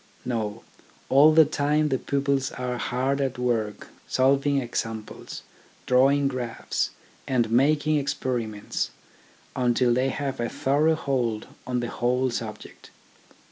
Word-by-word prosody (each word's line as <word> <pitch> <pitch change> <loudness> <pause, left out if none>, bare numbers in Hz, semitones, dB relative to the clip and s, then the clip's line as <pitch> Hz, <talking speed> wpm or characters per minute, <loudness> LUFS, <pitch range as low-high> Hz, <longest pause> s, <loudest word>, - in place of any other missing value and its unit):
No; 110 -3 -3 0.5
all 145 +4 +7
the 160 0 +7
time 150 +1 +1
the 130 -2 0
pupils 140 -1 0
are 125 -1 -3
hard 135 +3 0
at 130 -2 -1
work 115 -4 -2 0.2
solving 140 +2 +2
examples, 115 -3 -5 0.4
drawing 135 +2 +4
graphs, 125 -4 -2 0.4
and 120 -4 +1
making 150 +5 +3
experiments, 125 -7 -2 0.7
until 125 -1 +2
they 130 +2 +1
have 135 -1 -3
a 120 - -1
thorough 150 +4 +2
hold 125 -7 -1 0.2
on 125 -1 -1
the 120 - -3
whole 125 +1 0
subject. 110 -2 -7
130 Hz, 120 wpm, -25 LUFS, 120-140 Hz, 0.7 s, all